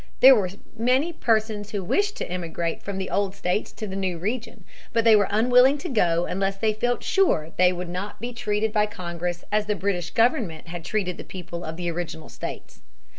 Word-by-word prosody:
There 265 +1 +10
were 200 -7 +2 0.3
many 255 +8 +2
persons 220 -6 0
who 205 -2 -3
wished 410 - +1
to - - -3
emigrate 170 -2 -3
from 200 -1 -5
the 190 -1 -4
old 200 -1 0
states 180 +4 -1
to 215 - -6
the 190 -2 -6
new 190 -3 -1
region. 220 +3 -4 0.3
But 230 -1 +3
they 225 -1 +7
were 205 -2 +4
unwilling 250 +6 +5
to 345 +5 -6
go 175 - +2
unless 195 +1 -1
they 215 +1 +1
felt 245 +3 -1
sure 385 - +3
that - - -24
they 180 0 +5
would 180 0 -4
not 185 +4 -5
be 240 +2 -5
treated 215 -2 -1
by 210 -1 +3
Congress 175 -3 -4
as 210 0 +1
the 210 - +1
British 185 -4 -1
government 215 -9 +1
had 170 -1 -6
treated 185 -2 -2
the - - -7
people 175 -2 -7
of 160 +1 -6
the 175 -1 -2
original 165 -2 -5
states. - - -8
200 Hz, 210 wpm, -25 LUFS, 175-225 Hz, 0.3 s, There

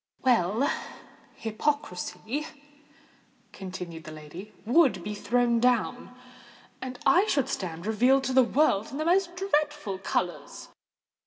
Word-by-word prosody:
"Well—hypocrisy," 225 - -2 1.0
continued 180 -4 -7
the 155 - -8
lady, 155 +7 -10
"would 250 - +4
be 210 - -4
thrown 235 +2 +1
down—and 250 +1 -3
I 375 +4 +5
should 280 - +1
stand 170 -2 -4
revealed 250 +5 +3
to 260 0 -1
the 260 - +7
world 240 -5 +2
in 275 - -6
the 310 - -2
most 355 +1 +2
dreadful 295 - -1
colours. 180 -2 -3
245 Hz, 105 wpm, -27 LUFS, 190-285 Hz, 1.0 s, the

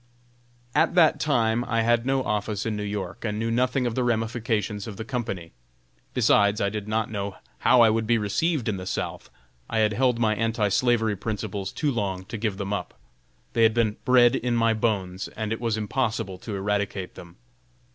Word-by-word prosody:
At - - +2
that 165 -3 +5
time 120 -5 +1
I 115 -1 +1
had 120 +1 +2
no 135 0 +1
office 105 -2 -2
in 110 -2 -1
New 105 - -3
York, 100 0 -4
and 105 -2 -2
knew 115 +1 -1
nothing 125 +2 +1
of 120 - -1
the 125 - 0
ramifications 110 -3 -1
of 105 -3 -7
the 110 - -5
company. 110 -9 -4 0.6
Besides, 100 0 +4
I 100 - +1
did 105 0 -5
not 110 0 -1
know 100 -2 -3 0.2
how 125 -1 +5
I 115 -2 +6
would 110 0 0
be 120 0 +4
received 125 - 0
in 105 -3 0
the 90 0 -7
South. - - -4 0.4
I - - -1
had 110 -1 +3
held 125 +1 +2
my 110 -2 +2
anti 110 -1 0
slavery 115 0 +2
principles 100 -1 -4
too 150 -3 -1
long 95 -6 -2
to 115 - -6
give 105 -3 -1
them 100 0 -3
up. 100 - -5 0.5
They 115 - +1
had 110 0 +5
been 110 -3 +1
bred 125 -2 +5
in 120 -1 0
my 115 -1 +3
bones, 100 -4 -1
and 110 0 -4
it 115 - -6
was 115 -2 0
impossible 110 -4 -2
to 105 - -6
eradicate 100 -1 -2
them. 85 -1 -12
110 Hz, 195 wpm, -25 LUFS, 100-120 Hz, 0.6 s, I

